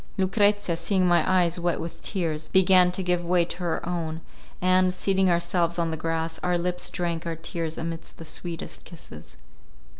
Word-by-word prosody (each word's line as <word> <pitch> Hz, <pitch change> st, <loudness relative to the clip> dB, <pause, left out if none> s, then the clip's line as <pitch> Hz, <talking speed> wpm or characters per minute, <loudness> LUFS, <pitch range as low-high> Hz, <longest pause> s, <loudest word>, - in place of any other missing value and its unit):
Lucrezia, 205 Hz, -1 st, +2 dB
seeing 185 Hz, +3 st, +1 dB
my 175 Hz, -1 st, +4 dB
eyes 175 Hz, -2 st, +2 dB
wet 175 Hz, 0 st, 0 dB
with 165 Hz, -, -7 dB
tears, 160 Hz, -5 st, -2 dB
began 185 Hz, -1 st, +5 dB
to 185 Hz, +1 st, -2 dB
give 180 Hz, -1 st, 0 dB
way 175 Hz, 0 st, +2 dB
to 170 Hz, -, -6 dB
her 170 Hz, -2 st, -2 dB
own, 165 Hz, -2 st, -3 dB, 0.4 s
and, 185 Hz, 0 st, +3 dB
seating 190 Hz, 0 st, +2 dB
ourselves 170 Hz, 0 st, +1 dB
on 165 Hz, -1 st, 0 dB
the -, -, -1 dB
grass, 165 Hz, 0 st, -2 dB
our 180 Hz, -1 st, +1 dB
lips 180 Hz, +1 st, -2 dB
drank 170 Hz, -1 st, -3 dB
our 165 Hz, -, -2 dB
tears 165 Hz, 0 st, -4 dB
amidst 165 Hz, 0 st, -6 dB
the 165 Hz, -, -9 dB
sweetest 165 Hz, +1 st, -6 dB
kisses. 80 Hz, -, -12 dB
175 Hz, 175 wpm, -26 LUFS, 165-180 Hz, 0.4 s, began